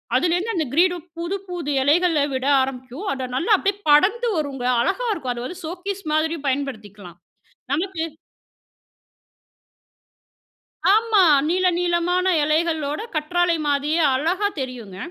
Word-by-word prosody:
அதிலிருந்து 355 Hz, -, +1 dB
அந்த 320 Hz, -, 0 dB
கிரீடம் 350 Hz, 0 st, +2 dB
புது, 345 Hz, +4 st, -3 dB
புது 345 Hz, -5 st, -4 dB
இலைகள 310 Hz, +1 st, +3 dB
விட 260 Hz, 0 st, -2 dB, 0.2 s
ஆரம்பிக்கும், 260 Hz, -, -5 dB
அத 260 Hz, -1 st, -4 dB
நல்லா 340 Hz, -, 0 dB
அப்டியே 395 Hz, +1 st, -1 dB
படர்ந்து 420 Hz, +11 st, +4 dB
வருங்க. 275 Hz, -4 st, -3 dB, 0.2 s
அழகா 480 Hz, -, -1 dB
இருக்கும். 260 Hz, -9 st, -3 dB
அத 240 Hz, -, -6 dB
வந்து 360 Hz, +4 st, -8 dB
சோக்கீஸ் 370 Hz, +4 st, -5 dB
மாதிரியும் 315 Hz, -1 st, -1 dB
பயன்படுத்திக்கலாம். 215 Hz, -10 st, -4 dB, 0.6 s
நமக்கு 335 Hz, +2 st, -2 dB, 2.9 s
ஆமா! 445 Hz, -2 st, +3 dB, 0.3 s
நீள 365 Hz, +3 st, +1 dB
நீளமான 355 Hz, +1 st, +1 dB, 0.2 s
எலைகளோட 310 Hz, -1 st, 0 dB, 0.2 s
கற்றாழை 345 Hz, +3 st, +1 dB
மாதிரியே 290 Hz, +3 st, +1 dB
அழகா 350 Hz, +9 st, 0 dB
தெரியுங்க. 240 Hz, -7 st, -6 dB
325 Hz, 115 wpm, -22 LUFS, 275-360 Hz, 2.9 s, படர்ந்து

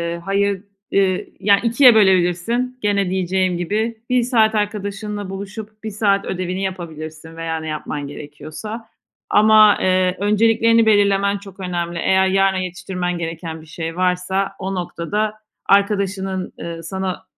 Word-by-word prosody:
ııı, -, -, -7 dB
hayır, 195 Hz, +2 st, 0 dB, 0.3 s
ııı, 190 Hz, -2 st, +2 dB
ya, 200 Hz, -1 st, +4 dB
2’ye 240 Hz, +2 st, +6 dB
bölebilirsin 195 Hz, +5 st, +2 dB
gene 200 Hz, -2 st, +1 dB
diyeceğim 185 Hz, -1 st, 0 dB
gibi 220 Hz, +6 st, -2 dB
1 250 Hz, -1 st, +3 dB
saat 225 Hz, -3 st, +3 dB
arkadaşınla 205 Hz, -1 st, -3 dB
buluşup 210 Hz, +2 st, -8 dB
1 220 Hz, -, -4 dB
saat 200 Hz, -1 st, +1 dB
ödevini 185 Hz, +1 st, -3 dB
yapabilirsin 160 Hz, -3 st, -6 dB
veya 165 Hz, -1 st, -3 dB
ne 160 Hz, -, -7 dB
yapman 150 Hz, -1 st, -4 dB
gerekiyorsa. 155 Hz, +11 st, -8 dB, 0.4 s
Ama, 215 Hz, 0 st, +6 dB
ııı, 185 Hz, 0 st, +2 dB
önceliklerini 225 Hz, +2 st, +3 dB
belirlemen 200 Hz, -1 st, +3 dB
çok 195 Hz, -1 st, -13 dB
önemli. 175 Hz, -2 st, -3 dB
Eğer 190 Hz, +2 st, +3 dB
yarına 195 Hz, 0 st, +2 dB
yetiştirmen 180 Hz, 0 st, -3 dB
gereken 165 Hz, -1 st, -5 dB
bir -, -, -15 dB
şey 165 Hz, +1 st, -6 dB
varsa 185 Hz, +2 st, 0 dB
o 190 Hz, 0 st, -3 dB
noktada 195 Hz, +4 st, -2 dB, 0.3 s
arkadaşının, 195 Hz, -2 st, +1 dB
ııı, 165 Hz, -1 st, -6 dB
sana, 190 Hz, +1 st, -4 dB
190 Hz, 135 wpm, -20 LUFS, 175-210 Hz, 0.4 s, 2’ye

